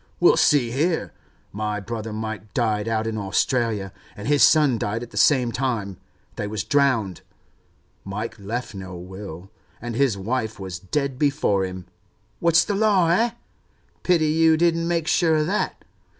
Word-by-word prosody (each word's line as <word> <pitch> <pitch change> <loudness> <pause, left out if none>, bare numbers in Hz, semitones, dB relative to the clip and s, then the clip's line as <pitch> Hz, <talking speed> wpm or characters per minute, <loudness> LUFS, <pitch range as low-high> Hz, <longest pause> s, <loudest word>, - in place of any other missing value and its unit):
Well, 175 - +6
see 145 -6 +3
here. 160 +6 -1 0.4
My 105 0 -3
brother 110 +1 -5
Mike 110 -1 -6
died 110 -3 0
out 110 -1 0
in 110 -1 -2
Australia, 105 0 0 0.2
and 105 - -6
his 145 -1 +3
son 145 -7 +5
died 110 +4 -2
at 120 - -10
the - - -13
same 125 -5 +3
time—they 110 -5 -5
was 105 -1 -3
drowned. 130 - +1 0.8
Mike 110 +3 -5
left 110 +4 -4
no 95 -2 -8
will, 95 0 -9 0.3
and 120 +1 -5
his 125 -3 +1
wife 110 +1 -3
was 95 -3 -6
dead 130 +8 -2
before 140 -9 +1
him. 90 -1 -7 0.5
What's 170 0 +4
the 205 - -1
law, 200 -4 +3
eh? 225 +8 +3 0.7
Pity 170 -3 +2
you 160 +1 +4
didn't 165 0 +2
make 170 -2 -1
sure 165 -1 +3
of 155 0 +1
that. 195 +6 -2
115 Hz, 155 wpm, -23 LUFS, 105-150 Hz, 0.8 s, Well